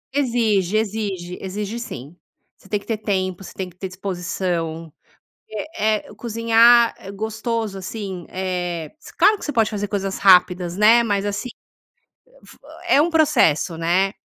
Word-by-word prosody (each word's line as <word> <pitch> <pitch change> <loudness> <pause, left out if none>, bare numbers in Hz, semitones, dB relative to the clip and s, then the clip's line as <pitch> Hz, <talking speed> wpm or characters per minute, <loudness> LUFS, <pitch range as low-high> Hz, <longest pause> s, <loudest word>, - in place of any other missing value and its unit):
Exige, 220 -8 +1
exige, 200 -5 -3
exige 205 +4 -4
sim, 150 - -8 0.4
você 195 - -21
tem 210 - 0
que - - -18
ter 225 - -2
tempo. 185 -3 -2
Você - - -10
tem 190 -1 -4
que 175 - -16
ter 190 +1 -5
disposição, 180 -4 -4 0.6
eh 215 -2 -2
eh, - - -12
cozinhar, 230 +1 +4
é 195 - -9
gostoso, 220 +1 -3
assim, 190 -3 -6
eh, 180 -3 -3 0.3
claro 405 +4 +5
que - - -10
você 295 - -2
pode 225 -4 +1
fazer 205 -1 -3
coisas 195 -1 -3
rápidas, 180 -2 +4
né, 225 +3 +6
mas 205 -3 0
assim, 205 +5 -3 1.0
fe - - -15 0.3
é 295 -4 +5
um 340 - 0
processo, 255 - +3
né? 180 +4 +1
200 Hz, 150 wpm, -21 LUFS, 185-225 Hz, 1.0 s, né